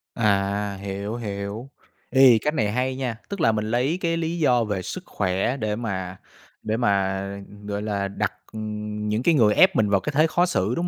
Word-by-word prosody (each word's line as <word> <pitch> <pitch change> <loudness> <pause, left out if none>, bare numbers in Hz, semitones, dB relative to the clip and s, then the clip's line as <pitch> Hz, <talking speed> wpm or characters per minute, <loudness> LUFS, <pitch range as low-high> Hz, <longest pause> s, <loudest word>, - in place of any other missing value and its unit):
À, 100 -2 +1
hiểu, 100 +2 -4
hiểu. 105 +2 -5 0.4
Ê, 130 -3 +7
cách 150 - 0
này 105 -9 0
hay 130 +3 -1
nha, 125 -4 -3
tức 200 -3 -4
là 115 - +5
mình 110 -1 -1
lấy 130 +8 +1
cái 165 -1 0
lý 165 +1 -2
do 125 -6 +3
về 105 -4 -2
sức - - -6
khỏe 95 +7 -1
để 105 -4 -1
mà 95 -5 -4 0.5
để 110 +1 -1
mà, 100 -4 +1 0.4
gọi 100 0 -3
là, 100 -2 -1
đặt 100 - -2 0.8
những 110 +3 0
cái 170 - +4
người 110 -6 +5
ép - - +5
mình 105 -2 +2
vào 100 -1 +3
cái 150 +10 -4
thế 155 +2 +5
khó 175 +2 +2
xử, 110 - 0
đúng 175 +1 -1
110 Hz, 200 wpm, -24 LUFS, 100-130 Hz, 0.8 s, Ê